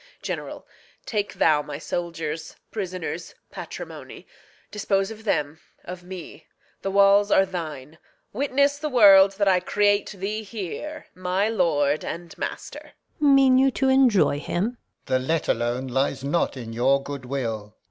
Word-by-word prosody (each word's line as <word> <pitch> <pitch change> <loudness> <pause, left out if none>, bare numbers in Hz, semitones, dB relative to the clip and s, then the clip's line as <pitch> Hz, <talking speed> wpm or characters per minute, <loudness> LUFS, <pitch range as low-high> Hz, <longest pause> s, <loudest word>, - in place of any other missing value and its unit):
General, - - -5 0.4
Take 210 -5 -2
thou 155 -2 +3
my 145 -1 -7
soldiers, 165 -1 -4 0.2
prisoners, 185 -4 -5 0.2
patrimony; - - -9 0.5
Dispose 195 -1 0
of 220 0 -11
them, 150 -5 -1 0.2
of 180 0 -8
me; 180 -2 -10 0.3
the 195 - -2
walls 200 +1 +5
are 195 - +5
thine. 160 -5 -7 0.3
Witness 280 +3 +1
the 305 +1 -2
world 195 -6 +7
that 200 0 0
I 185 -1 +4
create 205 +2 +1
thee 205 +2 -4
here 220 - -6
My 185 +3 0
lord 155 -8 +1
and 170 0 -6
master. - - -7 0.3
Gon. 285 -2 +5
Mean 265 -1 +5
you 270 +1 +5
to 265 0 0
enjoy 245 - +4
him? 175 +5 -1
Alb. 245 - -14 0.3
The 130 - +1
let 160 +5 -1
alone 120 +3 0
lies 135 +1 -1
not 145 0 0
in 115 -2 -7
your 135 +4 +2
good 140 -2 -7
will. 115 -6 -4
185 Hz, 145 wpm, -24 LUFS, 145-210 Hz, 0.5 s, world